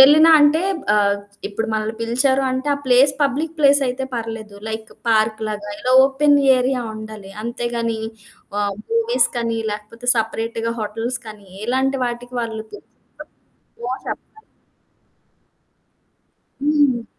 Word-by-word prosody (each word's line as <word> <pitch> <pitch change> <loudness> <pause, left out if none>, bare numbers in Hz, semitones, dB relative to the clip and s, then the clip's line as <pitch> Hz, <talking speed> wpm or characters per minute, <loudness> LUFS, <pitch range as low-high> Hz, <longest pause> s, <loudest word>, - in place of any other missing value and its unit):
వెళ్ళినా 305 +4 +8
అంటే 295 +2 +5 0.3
ఆహ్, 200 -1 +3 0.3
ఇప్పుడు 225 +2 -3
మనల్ని 220 0 -1
పిలిచారు 265 +4 +2
అంటే 260 +2 -3
ఆ - - -4
ప్లేస్ 260 +2 +5
పబ్లిక్ 290 +4 0
ప్లేసయితే 275 -3 +3
పర్లేదు. 225 -2 -5
లైక్ 220 0 -5 0.2
పార్క్‌లాగా 215 -1 0
ఇలా 255 +4 0
ఓపెన్ 285 +2 +3 0.2
ఏరియా 255 0 0
ఉండాలి. 215 -2 -9
అంతేగానీ 235 -1 -2 0.6
ఆహ్, 200 -1 -1
మూవీస్‌‌కనీ 245 - +1
లేకపోతే, 215 +4 -7
సెపరేట్‌గా 225 +1 -2
హోటల్స్‌కనీ 215 -1 -5 0.2
ఇలాంటి 265 +2 +1
వాటికి 245 +1 -5
వాళ్ళు 220 -2 -4
పిలిసినప్పుడు 420 - -14 0.6
నో 250 - -1 0.2
చెప్పాలి. 435 - -8 2.2
హ్మ్. 290 -5 +2
235 Hz, 110 wpm, -20 LUFS, 220-270 Hz, 2.2 s, వెళ్ళినా